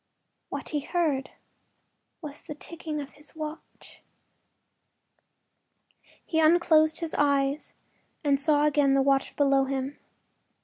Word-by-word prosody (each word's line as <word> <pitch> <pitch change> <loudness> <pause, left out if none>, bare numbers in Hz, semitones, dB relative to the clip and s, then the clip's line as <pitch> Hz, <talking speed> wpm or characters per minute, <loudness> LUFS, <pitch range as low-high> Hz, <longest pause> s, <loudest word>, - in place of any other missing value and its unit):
What - - -3
he 300 - -1
heard 285 -4 -1 0.9
was 295 -1 -8
the 300 - -8
ticking 315 0 -6
of 285 -1 -7
his 300 +2 -11
watch. 310 0 -9 2.2
He 320 - 0
unclosed 315 0 +4
his 330 -1 -3
eyes 280 0 +1 0.5
and 280 -2 +2
saw 295 0 +3
again 285 -2 +3
the 270 - +3
water 275 0 +2
below 275 -2 +3
him. 270 +1 -4
290 Hz, 115 wpm, -27 LUFS, 275-310 Hz, 2.2 s, unclosed